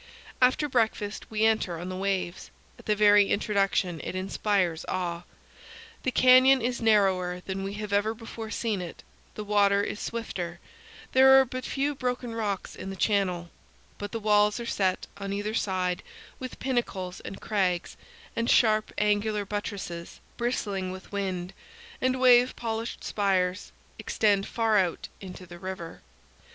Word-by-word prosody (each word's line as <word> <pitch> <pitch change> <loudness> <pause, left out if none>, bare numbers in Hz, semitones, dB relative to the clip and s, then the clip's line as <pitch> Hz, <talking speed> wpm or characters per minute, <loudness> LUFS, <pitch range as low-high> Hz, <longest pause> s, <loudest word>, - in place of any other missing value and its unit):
After 255 +4 +4
breakfast 220 -5 -1
we 220 0 +1
enter 220 -6 +1
on 175 +3 -6
the 185 - -4
waves. 190 -2 -2 0.3
At - - -15
the 210 - +3
very 205 -1 +5
introduction 195 -5 +1
it - - -5
inspires 185 -2 0
awe. 175 -1 -3 0.8
The - - 0
canyon 255 +1 +6
is 245 0 -2
narrower 190 -5 +2
than 190 +1 -4
we 195 +1 -4
have 210 -1 -5
ever 210 +2 +1
before 225 0 -8
seen 220 -3 -2
it; 175 -2 -8 0.3
the 210 - -5
water 200 -1 +3
is 210 - -4
swifter; 180 -7 -4 0.5
there 265 +1 +8
are 265 - +4
but 255 +1 -6
few 280 +2 -1
broken 250 -3 -3
rocks 210 -4 -3
in 190 - -7
the 195 - -5
channel; 185 -3 0 0.5
but 205 0 -5
the 230 - -3
walls 210 0 +3
are 235 - -5
set, 190 -5 0
on 200 0 -4
either 205 +2 -2
side, 185 -4 -1 0.4
with 255 -1 -7
pinnacles 200 -8 -2
and 195 - -8
crags; 185 -5 -1 0.4
and 230 +1 -1
sharp, 215 -2 +4
angular 210 0 +1
buttresses, 195 -4 -5 0.2
bristling 205 -6 -2
with 185 0 -10
wind 190 -2 -3 0.5
and 255 0 +1
wave 250 0 +6
polished 225 0 -4
spires, 190 -2 0 0.3
extend 200 -2 +1
far 225 -2 +2
out 180 -3 -1
into 185 -1 -9
the 175 0 -11
river. 185 -2 -7
205 Hz, 150 wpm, -27 LUFS, 185-225 Hz, 0.8 s, there